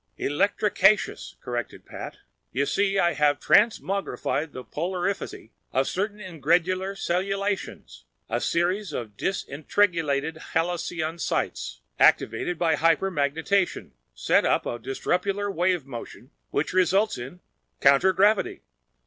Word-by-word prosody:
"Electricaceous," 200 +5 +1
corrected 120 -2 -5
Pat. - - -8 0.3
"You 140 +2 0
see, 195 +4 +1
I 175 -2 +3
have 145 -1 +2
transmogrified 195 -7 +1
the 130 - -8
polarifity 180 - -3 0.2
of 135 +1 +1
certain 205 +3 -2
ingredular 185 +2 0
cellulations. 195 +3 -3 0.2
A - - -1
series 180 +4 0
of 110 -4 -5
disentrigulated 160 - 0 0.2
helicosities, 165 -1 -2 0.2
activated 180 - +3
by 160 -2 +2
hypermagnetation, 165 - +1 0.2
set - - +3
up - - +1
a 120 - -3
disruptular 195 - -1
wave 180 -4 +1
motion 130 +1 -9 0.2
which - - -1
results 185 - +2
in—counter 140 +3 +1
gravity!" 205 +3 +2
175 Hz, 100 wpm, -25 LUFS, 145-195 Hz, 0.3 s, I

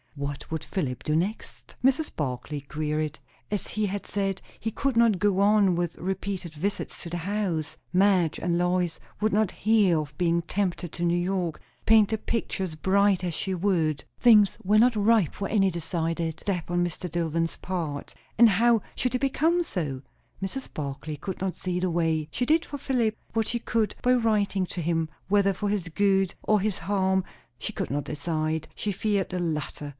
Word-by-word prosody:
What 140 0 -5
would 160 - -2
Philip 140 -10 -3
do 150 - 0
next? 190 +7 -3
Mrs. 270 +4 +2
Barclay 145 +1 -3
queried. 150 +1 -2 0.3
As 205 -1 -2
he 215 0 -1
had 200 0 -3
said, 195 -2 -2 0.2
he 225 - -2
could 270 +1 -1
not 230 -5 +4
go 200 0 +2
on 200 -2 +4
with 175 -1 -2
repeated 190 -2 -3
visits 190 +7 -3
to 170 - -6
the 175 - -3
house. 175 -4 -2 0.2
Madge 185 -4 +3
and 170 -1 0
Lois 175 -1 0 0.2
would 215 +1 +2
not 210 -1 +2
hear 205 -6 +3
of 150 -1 -6
being 170 -1 +2
tempted 175 -1 -2
to 175 - -4
New 170 0 +2
York, 175 -2 -1 0.2
paint 220 -2 +6
the 220 - 0
picture 215 -3 -2
as 170 -4 -4
bright 195 +3 +3
as 175 -2 -1
she 190 - -2
would. 170 -5 +1 0.2
Things 215 -5 +6
were 210 +3 +4
not 240 +1 +5
ripe 210 -4 +3
for 200 - -3
any 195 -3 +3
decided 165 -1 -2
step 180 -5 -2
on 175 0 +2
Mr. 175 +1 -5
Dillwyn's 165 0 -1
part, 165 -6 -4 0.2
and 235 0 +8
how 230 +3 +4
should 250 - -1
they 250 - +1
become 320 +6 +2
so? 145 - -3 0.4
Mrs. 195 +8 -4
Barclay 150 +1 -4
could 185 +6 -6
not 190 -1 -2
see 180 -1 -2
the 185 0 0
way. 160 -2 +1
She 250 - -1
did 320 +5 +3
for 285 - -6
Philip 240 -5 0 0.2
what 225 -2 +1
she 235 - -1
could 225 -2 0
by 250 - +4
writing 210 -5 +2
to 175 - -4
him, 165 -1 0 0.2
whether 200 -1 +4
for 205 +2 -2
his 200 -4 -1
good 195 +2 +2
or 215 -1 +3
his 200 0 -1
harm 190 -1 +1 0.4
she - - -3
could - - -4
not 145 +1 -1
decide. 155 +1 -2
She 210 - -2
feared 200 0 0
the 180 - -3
latter. 150 -3 -3
185 Hz, 190 wpm, -27 LUFS, 165-210 Hz, 0.4 s, and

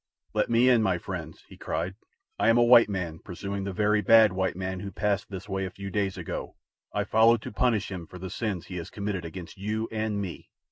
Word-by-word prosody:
"Let - - +1
me 120 +2 +4
in, 125 -3 +5
my 95 -4 +2
friends!" 85 -3 -7
he - - -14
cried. 90 +2 -3 0.5
"I - - +4
am 115 - +5
a 120 - +6
white 120 -2 +7
man 85 -5 -3
pursuing 100 +2 -5
the 100 - -2
very 105 +3 +2
bad 110 -2 +6
white 95 -1 0
man 95 0 -3
who 100 - -5
passed 100 +3 -1
this 100 0 -7
way 95 -1 -2
a 95 - -2
few 100 0 -8
days 100 0 -1
ago. - - -5 0.4
I - - 0
follow 115 +1 +5
to 110 - -8
punish 110 -2 +1
him 90 -3 -6
for 90 - -11
the 90 0 -7
sins 100 -5 -3
he 90 - -7
has 85 - -6
committed 100 -4 -3
against 85 +2 -8
you 110 +3 -2
and 110 -2 -1
me. 95 -4 -6
100 Hz, 230 wpm, -27 LUFS, 95-110 Hz, 0.5 s, white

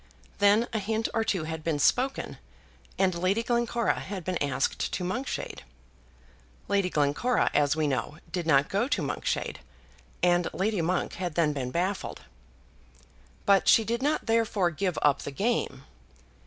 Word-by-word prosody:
Then 205 +3 +4
a 220 - +1
hint 220 +2 -1
or 225 - +1
two 190 -6 0
had 160 0 -5
been 160 -2 0
spoken, 255 - +1 0.6
and 190 -1 +2
Lady 185 +6 0
Glencora 235 -1 0
had 190 -2 -6
been 180 0 -2
asked 140 -1 0
to 180 - -2
Monkshade. 245 +10 -3 1.1
Lady 200 -2 +1
Glencora, 150 - +1
as 145 0 +3
we 155 -1 0
know, 140 +2 -2
did 175 -3 -3
not 140 -2 +4
go 205 +6 0
to 250 -10 0
Monkshade, 140 - -2 0.6
and 175 -1 +3
Lady 200 -1 0
Monk 180 +2 -1
had 175 -4 -3
then 160 -3 +2
been 130 -3 -3
baffled. 185 +7 -2 1.2
But 200 -1 +4
she 225 - +6
did 235 +3 -2
not 295 +3 0
therefore 225 -6 +2
give 175 +2 -2
up 145 -1 +3
the - - -5
game. 215 - -1
185 Hz, 155 wpm, -28 LUFS, 155-225 Hz, 1.2 s, she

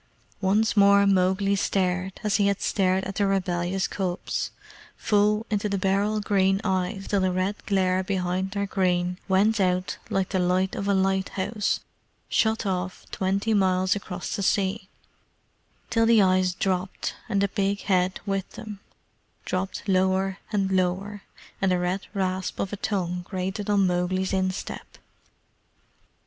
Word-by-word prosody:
Once 205 +3 +2
more 200 0 +6
Mowgli 195 +1 +2
stared, 185 -1 -1
as 210 -2 +2
he 200 -2 +3
had 200 -1 +1
stared 190 -1 +1
at 195 - -4
the 200 -2 +2
rebellious 185 -1 0
cubs, 185 -2 -3 0.5
full 210 0 +2
into 210 0 0
the 200 - 0
beryl 200 +3 +1
green 195 -2 +2
eyes 190 0 -1
till 200 -2 +1
the 185 0 +2
red 185 +3 -2
glare 185 -2 +2
behind 185 0 -1
their 200 0 -2
green 180 -2 0
went 205 +3 +3
out 185 -1 0
like 195 -1 0
the 190 - 0
light 185 +1 +1
of 200 - -3
a 200 - +3
lighthouse 190 +2 0 0.5
shut 220 0 +1
off 180 -1 -3
twenty 195 +4 0
miles 185 -2 +2
across 190 -3 -5
the 205 - -3
sea; 195 +1 0 1.0
till 225 -1 +3
the 230 -1 +6
eyes 185 -2 +3
dropped, 185 0 -2 0.2
and 200 - +1
the 200 - +3
big 200 0 -1
head 185 -1 +1
with 195 -2 -2
them 210 -2 -8 0.7
dropped 190 +3 -3
lower 190 0 +1
and 195 -3 0
lower, 190 +2 0 0.4
and 195 -1 +2
the 180 - +3
red 180 +2 -2
rasp 185 -1 -2
of 195 - -2
a - - -3
tongue 180 -3 -2
grated 190 +2 -3
on 200 -2 +4
Mowgli's 185 +1 0
instep. 185 0 -3
190 Hz, 150 wpm, -25 LUFS, 185-200 Hz, 1.0 s, more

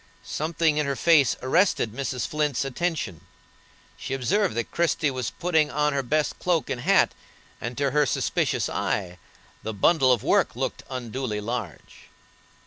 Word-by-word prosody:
Something 160 0 0
in 150 -1 +1
her 140 - -1
face 150 -4 +4
arrested 130 - +2
Mrs. 130 -1 -3
Flint's 150 -3 -1
attention; 135 - -3 0.8
she 135 - -4
observed 190 - +1
that 120 -1 -3
Christie 165 -3 +1
was 130 -3 -3
putting 160 -2 +1
on 150 0 +1
her 140 - +1
best 150 +4 -1
cloak 175 -4 0
and 120 - -3
hat, 195 +7 +3 0.5
and 120 +1 -5
to 140 -1 +1
her 150 0 +3
suspicious - - 0
eye 90 -3 -2 0.4
the 110 -1 -5
bundle 130 - +4
of 120 -4 +2
work - - +2
looked - - -3
unduly 125 -3 -4
large. 110 -5 -6
140 Hz, 150 wpm, -25 LUFS, 120-155 Hz, 0.8 s, face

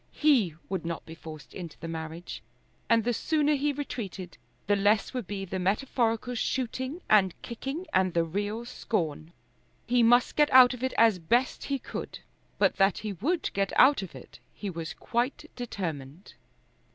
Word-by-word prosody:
He 245 - +3
would 190 -3 -3
not 170 -1 -4
be 160 - -9
forced 160 -2 -11
into 170 -4 -8
the 165 - -6
marriage, 165 +1 -6 0.5
and 230 -1 +4
the 240 +2 +1
sooner 300 +4 +1
he 290 +1 +1
retreated 215 -10 -6 0.3
the 205 - +3
less 205 +3 +2
would 250 -7 -4
be 195 -1 -4
the 190 0 -4
metaphorical 230 +4 0
shooting 260 +6 -2
and 190 -4 +4
kicking 270 +9 -5
and 185 -2 +2
the 170 - +3
real 205 +7 -3
scorn. 165 -10 -3 0.5
He 245 +1 +3
must 240 +2 +4
get 295 -1 +4
out 255 -1 +8
of 250 - -8
it 260 0 -1
as 225 -5 +5
best 240 +10 +1
he 280 - -1
could; - - -7 0.4
but - - +2
that 195 0 +3
he 210 - -2
would 305 - -1
get 195 0 0
out 275 0 +6
of 190 - -8
it - - -13 0.2
he 200 -2 -5
was 165 -2 -6
quite 255 +6 -2
determined. 170 - -6
215 Hz, 170 wpm, -28 LUFS, 180-255 Hz, 0.5 s, out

